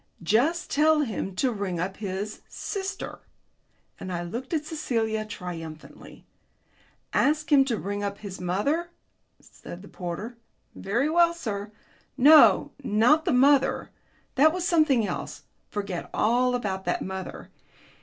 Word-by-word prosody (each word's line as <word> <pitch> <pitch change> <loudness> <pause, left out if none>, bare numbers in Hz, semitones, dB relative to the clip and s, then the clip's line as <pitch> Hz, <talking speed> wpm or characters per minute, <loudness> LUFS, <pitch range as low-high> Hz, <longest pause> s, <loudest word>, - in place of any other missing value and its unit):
Just 275 - +1
tell 310 +1 +4
him 215 -7 -3
to 255 +6 +1
ring 200 -5 -3
up 190 +3 -3
his 200 +1 -5
sister." 390 -1 -5 0.8
And 185 - -6
I 175 -1 -3
looked 235 +10 -6
at 310 -3 -1
Celia 225 -9 -2
triumphantly. 165 -6 -9 0.9
"Ask 305 +1 +1
him 280 -2 +7
to 240 -5 -1
ring 205 +1 -4
up 200 0 -3
his 195 -3 -8
mother," 280 - -1 0.5
said 175 +3 -12
the - - -11
porter. 195 +8 -6 0.4
"Very 235 +9 -1
well, 340 +1 +3
sir." 210 -9 -5 0.5
"No, 295 +4 +7
not 250 +8 +3
the - - +1
mother. 275 +2 +3 0.4
That 300 +3 +5
was 355 +1 -2
something 300 -9 +3
else. - - -5 0.3
Forget 200 -4 -4
all 250 +3 +2
about 195 -5 -3
that - - -1
mother. 190 0 -7
225 Hz, 135 wpm, -26 LUFS, 195-300 Hz, 0.9 s, him